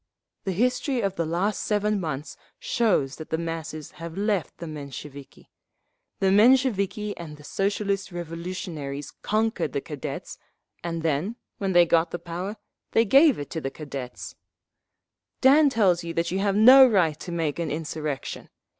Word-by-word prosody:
The 190 - 0
history 250 - 0
of 195 -2 -1
the 165 -1 -1
last 180 +6 0
seven 210 0 0
months 155 -4 -4 0.2
shows 225 - +1
that 155 - -9
the 160 - 0
masses 165 -2 -5
have 165 +1 -7
left 205 -3 -1
the 170 - -7
Mensheviki. 140 -2 -9 0.7
The 190 -1 +2
Mensheviki 210 -2 +3
and 155 -3 -8
the 150 - -15
Socialist 200 +2 -1
Revolutionaries 165 -4 -5
conquered 220 +2 0
the - - 0
Cadets, - - -6 0.4
and 165 -1 -3
then 165 +8 0 0.2
when 195 -2 -1
they 175 0 +7
got 165 0 +3
the - - -4
power, 175 +5 -5 0.4
they 225 - +4
gave 275 +5 +6
it 145 -1 -7
to 160 - -3
the 135 - -2
Cadets…. 135 -4 -7 1.1
"Dan 285 +3 +6
tells 190 -9 +2
you 165 0 -5
that 170 +1 0
you 190 - 0
have 200 0 +1
no 255 +5 +9
right 170 -9 +2
to 175 - -7
make 165 -2 -2
an 165 -2 -1
insurrection. 155 -2 -4
175 Hz, 155 wpm, -25 LUFS, 160-210 Hz, 1.1 s, no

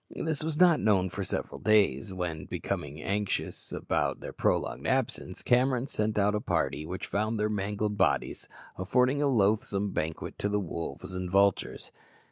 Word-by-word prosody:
This 160 -2 -2
was 160 -1 -2
not 175 -3 +6
known 95 -4 +2
for 100 - -3
several - - -3
days, 100 -8 +3
when, 90 -4 -4
becoming 75 +2 -4
anxious 100 0 -2
about - - -1
their - - -7
prolonged - - 0
absence, - - -1
Cameron 125 0 +3
sent 110 -5 -1
out 105 0 +3
a 105 - 0
party, 75 -5 -1
which 90 +2 -4
found 110 +2 -1
their 105 0 +1
mangled 105 0 -1
bodies - - +1 0.3
affording 125 +9 +2
a 145 - +3
loathsome 105 -4 +2
banquet 80 -2 -3
to 100 - 0
the 105 0 +1
wolves 85 -1 -5
and 90 0 -3
vultures. 100 +1 +2
105 Hz, 160 wpm, -29 LUFS, 95-110 Hz, 0.3 s, not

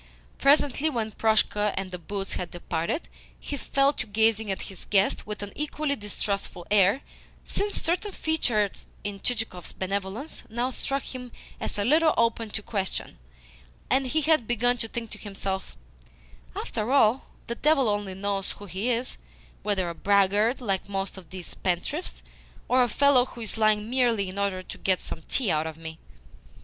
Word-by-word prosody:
Presently, 285 +1 +4
when 225 -6 -2
Proshka 210 -1 +2
and 190 -1 -2
the 180 - -5
boots 195 +3 -4
had 180 - -3
departed, 170 - -2 0.3
he 285 - -4
fell 275 0 +2
to 240 - -4
gazing 220 0 +3
at 190 - -2
his 190 - -8
guest 195 0 +2
with 210 -1 -4
an 205 - -7
equally 300 -1 -1
distrustful 200 -5 -3
air, 205 +5 +5 0.4
since 410 0 0
certain 365 +5 0
features 240 - 0 0.2
in 205 -1 -4
Chichikov's 220 -7 -2
benevolence 195 +8 -3
now 240 +3 -1
struck 275 +2 -2
him 250 -2 -7 0.3
as - - -4
a 205 - +1
little 315 +4 +5
open 230 -1 +2
to 205 0 -4
question, 195 - -3 0.7
and 270 -1 +3
he 315 +5 +1
had 310 -6 +3
begin 245 +1 +2
to 225 - -2
think 230 0 -5
to 215 - -7
himself: 195 -2 -4 0.8
"After 220 +3 -2
all, 260 -2 +4 0.2
the 235 - -3
devil 275 0 +3
only 205 -2 -1
knows 195 0 -2
who 205 - -10
he 195 +5 -2
is 245 +1 0 0.4
whether 195 -4 +1
a 170 - -3
braggart, 205 +6 +3
like 195 -4 -1
most 195 -1 -2
of 185 -5 -12
these 185 -2 -7
spendthrifts, 185 - -2 0.4
or 255 +1 +4
a 245 - +3
fellow 280 +1 +5
who 240 - -10
is 220 - -5
lying 215 -1 +3
merely 235 -6 +2
in 190 +2 -5
order 195 -2 0
to - - -8
get 185 -1 +3
some 160 - -6
tea 245 -8 +2
out 155 +1 +1
of 160 -1 -6
me." 160 0 -8
215 Hz, 170 wpm, -27 LUFS, 195-250 Hz, 0.8 s, air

